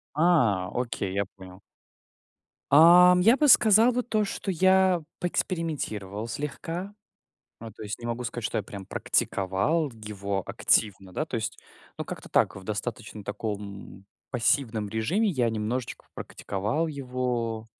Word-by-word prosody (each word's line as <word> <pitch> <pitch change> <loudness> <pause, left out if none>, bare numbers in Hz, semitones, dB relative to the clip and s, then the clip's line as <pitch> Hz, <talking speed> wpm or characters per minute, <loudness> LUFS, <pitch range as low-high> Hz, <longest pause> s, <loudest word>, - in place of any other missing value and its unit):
А, 135 - +3
окей, 115 -6 -3
я 100 0 0
понял. 95 0 -13 1.1
Ам, 180 +4 +8
я 230 +7 +5
бы 300 - +3
сказал 225 -2 +6
вот 245 0 -2
то, 215 -1 +1
что 195 0 -4
я 185 0 +3 0.2
поэкспериментировал 135 - -3
слегка. 165 - -5 0.7
Ну 115 -1 -9
то 110 - -14
есть 105 -1 -5
не 120 - -8
могу 120 +1 -3
сказать, 120 -1 -4
что - - -2
я - - -1
прям 100 -2 -9
практиковал 100 - 0
его 100 -3 -4
активно, 95 -3 0
да, 155 - -2
то 130 - -5
есть 110 - -4 0.4
ну - - -4
как-то - - -8
так - - +2
в 95 - -10
достаточно 105 0 -5
таком 100 -1 -6 0.2
пассивном 115 -3 0
режиме, 150 - 0
я 125 -9 +1
немножечко 115 +3 -4
попрактиковал 105 +12 -3
его 125 -5 -3
120 Hz, 140 wpm, -27 LUFS, 105-165 Hz, 1.1 s, Ам